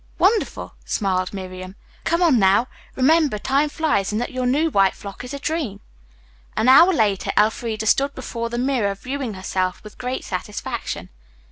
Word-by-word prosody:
"Wonderful," 425 +3 +1
smiled 185 -3 -1
Miriam. 185 -1 -7 0.3
"Come 335 +2 +2
on 295 -9 +4
now. 195 +4 +4 0.3
Remember, 290 -2 +3
time 275 +7 +1
flies 290 - 0
and 210 - -1
that 245 - -3
your 255 -1 -1
new 305 +6 +2
white 195 -4 +3
frock 200 +3 -9
is 250 - -8
a 280 - -4
dream." 280 -9 -3 0.8
An 225 - +2
hour 305 +8 +8
later 210 - +1
Elfreda 220 +1 +1
stood 275 +5 +2
before 235 -3 -4
the 240 - -4
mirror 245 -6 0
viewing 255 0 -4
herself 185 -1 -2
with 210 0 -13
great 255 +1 -3
satisfaction. 200 +3 -5
235 Hz, 160 wpm, -22 LUFS, 200-280 Hz, 0.8 s, hour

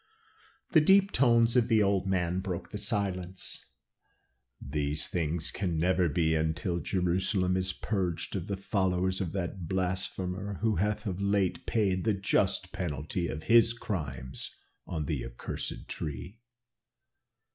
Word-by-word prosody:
The 160 - +7
deep 195 +4 +5
tones 115 -2 +4
of 120 -2 +4
the 110 -3 +4
old 100 -1 +1
man 90 -1 +1
broke 90 -2 -4
the 105 - -4
silence. 95 -5 -3 1.0
"These 75 +1 -1
things 80 -1 -1
can 90 -5 -1
never 90 +1 +3
be 80 +1 +2
until 80 +3 0
Jerusalem 90 +1 +1
is 95 0 0
purged 90 -3 -2
of 95 -1 -3
the 100 - -2
followers 95 -1 0
of 90 -4 -2
that 90 -2 -3
blasphemer, 95 +1 -2
who 110 -2 +2
hath 105 +5 0
of 95 -1 -3
late 100 -2 +1
paid 95 -5 +1
the 110 -3 +2
just 95 -1 +1
penalty 85 +1 -2
of 75 0 -5
his 115 0 +6
crimes 70 - -4 0.4
on 80 -3 -2
the - - -2
accursed - - -5
tree. 75 - -5
95 Hz, 135 wpm, -30 LUFS, 85-100 Hz, 1.0 s, The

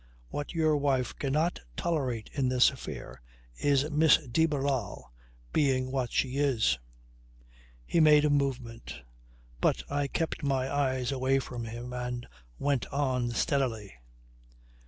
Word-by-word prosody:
What 145 +3 -5
your 155 -2 +3
wife 135 -3 0
cannot 155 +5 0 0.2
tolerate 130 -10 -2
in 135 -3 +1
this 125 +1 +5
affair 130 - -8 0.4
is 140 0 +2
Miss 150 +1 +6
de 160 +7 +2
Barral 135 - -2 0.4
being 130 -3 +2
what 130 -3 -1
she 130 +1 0
is." 125 - +2 1.1
He 170 - +1
made 150 -1 +6
a 150 - +3
movement, 130 - -2 0.6
but - - +1
I 145 0 0
kept 165 +4 -2
my 135 -2 0
eyes 130 -3 0
away 135 0 +1
from 120 -3 -4
him 120 +2 -7
and 125 0 -4 0.3
went 140 -7 0
on 130 -4 0
steadily. 115 -4 -1
135 Hz, 130 wpm, -29 LUFS, 125-145 Hz, 1.1 s, Miss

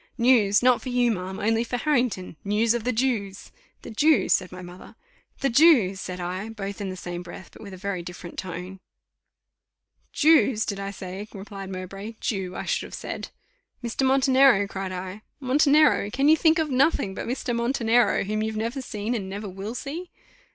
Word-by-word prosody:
"News! 235 -4 +4
not 250 -1 +4
for 255 - -6
you, 245 -1 +2
ma'am, 190 -2 -4
only 225 +2 +1
for 245 +1 -3
Harrington; 245 - 0
news 215 +3 +2
of 240 -2 -3
the 250 - +2
Jews." 220 -5 -2 0.3
"The - - -8
Jews!" 300 +7 +3
said 185 -1 0
my 180 0 -9
mother. 180 +1 -12 0.5
"The 275 - +2
Jews!" 230 - +5
said 180 0 -6
I, 185 +4 -4
both 200 -2 -6
in 195 - -3
the 185 - -5
same 175 -1 -6
breath, 180 0 -11
but - - -14
in 200 -3 -9
very 195 -1 -3
different 175 0 -8
tones. 185 +1 -7 1.3
"Jews, 290 -8 +4
did 200 -2 -4
I 195 0 -4
say?" 195 +1 -7
replied 195 -1 -8
Mowbray: 195 +4 -7
"Jew, 190 -4 -3
I - - -5
should - - -1
have - - -8
said." - - -6 0.5
"Mr. 235 +3 -2
Montenero?" 265 -5 +4
cried 195 -1 -5
I. 185 +2 -6 0.2
"Montenero! 285 -3 +4
Can 270 +6 +2
you 315 - +7
think 320 +1 +3
of 315 -3 0
nothing 260 -7 +2
but - - -6
Mr. 245 -1 -2
Montenero, 235 0 +2
whom 215 +2 -2
you've 220 0 -2
never 230 +5 -2
seen, 215 -1 -4
and 200 -5 -3
never 205 +2 -5
will 195 +5 -6
see?" 330 +8 -6
215 Hz, 185 wpm, -25 LUFS, 190-250 Hz, 1.3 s, you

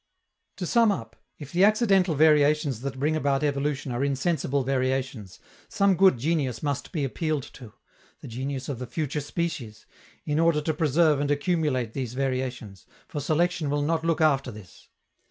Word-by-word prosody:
To 180 - -4
sum 230 +3 +4
up, 115 - -5 0.2
if 145 -2 -10
the 180 +2 +3
accidental 195 -5 +3
variations 150 -4 +3
that 135 0 -5
bring 150 +4 0
about 140 -2 0
evolution 140 -1 -1
are 120 +3 -1
insensible 140 0 0
variations, 130 -5 -2 0.3
some 200 -1 +3
good 190 -6 +5
genius 140 -1 -1
must 145 -3 -3
be 155 -6 -2
appealed 155 +1 -2
to 120 -5 -12 0.5
the - - -10
genius 130 +3 -4
of 135 -5 -4
the 125 - -5
future 150 +2 -3
species 145 -8 -4 0.4
in 150 +1 0
order 165 -2 +3
to 155 +1 -1
preserve 155 0 +2
and 145 0 -1
accumulate 145 -6 0
these 125 -3 -4
variations, 130 -6 -3 0.2
for 145 - -5
selection 160 +1 0
will 145 0 0
not 160 +2 0
look 165 -1 0
after 140 -4 +2
this. 105 -6 -13
145 Hz, 165 wpm, -26 LUFS, 130-160 Hz, 0.5 s, good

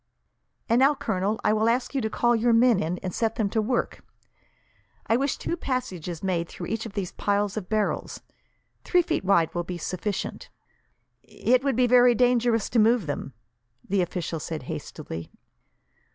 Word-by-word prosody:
"And 230 +1 +3
now, 275 +3 +5
Colonel, 215 -5 -1
I 210 - +3
will 220 +1 +2
ask 245 +3 0
you 270 - 0
to 220 - -1
call 240 +2 +2
your 230 +1 +2
men 230 -2 +5
in, 170 +1 -2
and 185 -2 -3
set 225 -1 0
them 205 -3 -1
to 220 - +1
work. 240 +3 -2 1.0
I 225 - +2
wish 275 +3 0
two - - -3
passages 190 - -4
made 175 -3 -1
through - - -7
each 225 0 -3
of 210 - -12
these 195 -4 -3
piles 205 0 0
of 205 -5 -5
barrels. 215 -1 -1 0.6
Three 360 -1 +3
feet 325 - -1
wide 185 -4 +3
will 175 - -1
be 180 +1 -5
sufficient." 185 +4 -4 0.7
"It 255 +2 +1
would 275 -3 +1
be 250 +1 +3
very 245 0 +5
dangerous 240 -2 +2
to 235 - +3
move 225 -2 +4
them," 145 -2 -4 0.5
the 195 0 +1
official 170 -2 -3
said 155 -2 -5
hastily. 80 -8 -7
220 Hz, 175 wpm, -26 LUFS, 185-245 Hz, 1.0 s, now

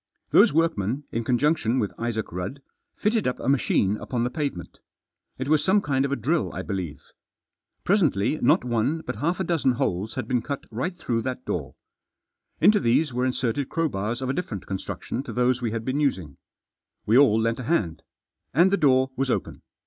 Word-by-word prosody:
Those - - +6
workmen, 145 - 0
in 115 - -2
conjunction 125 0 +1
with 105 -6 -1
Isaac 115 -2 -2
Rudd, 95 +11 -5 0.3
fitted 215 0 +1
up 125 - -2
a - - -5
machine 110 -6 +2
upon 120 +1 -2
the 125 - -1
pavement. 140 - -4 0.6
It 130 - -4
was 155 0 +3
some 190 +2 +4
kind 140 -6 0
of 140 - -3
a - - +2
drill 150 +7 0
I - - -4
believe. 90 -9 -5 0.8
Presently 155 - +2
not 120 - +4
one 120 +7 0
but 125 -7 -5
half 165 - -1
a - - +1
dozen 165 -7 +1
holes 105 -1 -2
had 130 -4 -3
been 125 0 +1
cut 140 +3 -5
right 130 - -3
through 120 -8 -1
that 130 +1 -4
door. - - -4 0.8
Into 210 0 +5
these 130 +1 +2
were 125 +1 +1
inserted 130 +1 -1
crowbars 120 -6 -1
of 130 - -2
a - - +1
different 120 - -4
con 95 -1 -3
struction 120 - -5
to 140 - -8
those 125 +1 +1
we 120 - 0
had 115 0 -4
been 130 +2 -1
using. 95 - -1 0.7
We 110 - +3
all 125 -5 +6
lent 115 +1 0
a 125 - -5
hand. 105 - 0 0.5
And 175 +5 +5
the 200 - +3
door 130 -3 +3
was 135 0 -1
open. - - -2
130 Hz, 195 wpm, -25 LUFS, 110-150 Hz, 0.8 s, Those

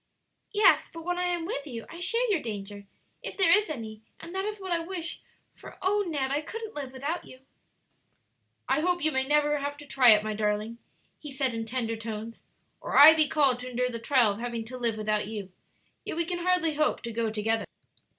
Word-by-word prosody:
"Yes; 420 0 +4
but 330 0 -9
when 355 0 -1
I 360 - 0
am 350 -2 -1
with 300 -6 -4
you 230 -4 -7
I 340 - -10
share 465 +7 +2
your 370 - +2
danger, 205 -2 -7 0.3
if - - -6
there 350 -4 +6
is 420 -3 +1
any, 220 -7 -6 0.2
and 335 - -10
that 385 +1 -2
is 425 0 -4
what 380 -2 -6
I 340 - +2
wish; 340 0 -4 0.3
for - - -13
oh, 410 +2 +1
Ned, 275 -5 -2
I 290 +2 0
couldn't 445 +6 -7
live 275 -3 -6
without 285 +6 -4
you!" 255 - -14 1.3
"I 265 +3 +2
hope 350 +1 0
you 310 - +3
may 265 -1 +1
never 295 0 +2
have 285 +1 -4
to 295 - -11
try 265 -3 +5
it, 210 -1 +7
my 215 0 -2
darling," 210 +2 -2 0.4
he 295 - -9
said, 265 -2 -1
in 225 0 -4
tender 230 -1 -2
tones, 225 0 -7 0.4
"or - - -2
I 300 +3 +11
be 310 -1 +3
called 275 -5 +2
to 250 0 -6
endure 250 0 -1
the 230 - -5
trial 235 -2 +3
of 200 - -6
having 235 -1 -4
to 255 +3 -7
live 230 -3 0
without 215 -1 -1
you; 205 -3 -6 0.5
yet - - -5
we 340 - +1
can 350 +1 -3
hardly 360 -2 +1
hope 305 +1 0
to 235 - -4
go 230 0 -1
together. 220 +1 -1
270 Hz, 220 wpm, -28 LUFS, 225-335 Hz, 1.3 s, I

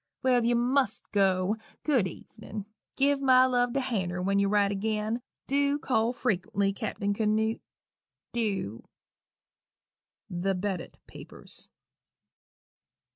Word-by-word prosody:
Well, 255 -1 +4
if 235 - -1
you 240 +1 +3
must 245 -1 +1
go, 195 +1 +2 0.3
good 255 -11 +2
evenin'! 200 +3 -9 0.3
Give 280 0 +2
my 255 -1 +6
love 245 -1 +1
to 275 - +1
Hanner 185 -8 -2
when 195 +2 +1
you 200 0 +2
write 205 -1 +3
agin 215 +3 -1 0.2
dew 280 +1 +2
call 240 -5 +1
frequently, 200 -4 0
Cappen 200 +1 -2
Canoot, 220 +1 0 0.7
dew." 200 - -2 1.5
_The 180 +1 -1
Bedott 190 -3 -3
Papers. - - -12
215 Hz, 115 wpm, -28 LUFS, 195-250 Hz, 1.5 s, my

